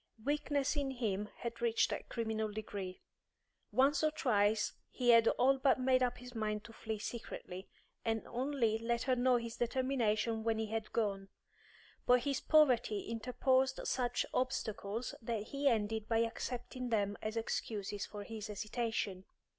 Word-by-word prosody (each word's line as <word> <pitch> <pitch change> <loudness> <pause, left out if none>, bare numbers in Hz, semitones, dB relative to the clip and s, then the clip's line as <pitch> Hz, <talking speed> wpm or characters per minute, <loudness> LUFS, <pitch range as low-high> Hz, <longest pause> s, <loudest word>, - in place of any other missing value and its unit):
Weakness 290 -1 +1
in 285 -2 0
him 210 -5 -2
had 235 0 -4
reached 230 -1 +2
a - - -2
criminal 220 -2 -2
degree. 205 -3 -6 0.7
Once 280 +3 +3
or 310 - +5
twice 220 -8 +2 0.2
he 245 -1 +3
had 230 -1 +7
all 270 +1 +4
but 265 0 +4
made 255 0 +3
up 245 -1 +1
his 250 0 -10
mind 215 -2 -2
to 225 - -12
flee 220 -1 -4
secretly, 205 -4 -6 0.3
and 225 -1 -1
only 245 -3 0
let 235 +1 0
her 260 -2 +2
know 250 0 +4
his 235 -1 -5
determination 235 -3 +1
when 225 -1 +1
he 220 - 0
had 220 0 -3
gone; 195 -3 -1 0.8
but 250 0 +6
his 275 -1 -1
poverty 250 -9 +4
interposed 260 +3 +1
such 245 -1 0
obstacles 225 -3 -2
that 225 -2 -2
he 280 0 0
ended 220 -3 +1
by 225 - +3
accepting 245 +2 -2
them 205 -3 +1
as 215 +1 -3
excuses 205 -3 -2
for 205 -1 -7
his 220 0 -6
hesitation. 210 -2 -2
230 Hz, 155 wpm, -35 LUFS, 215-255 Hz, 0.8 s, had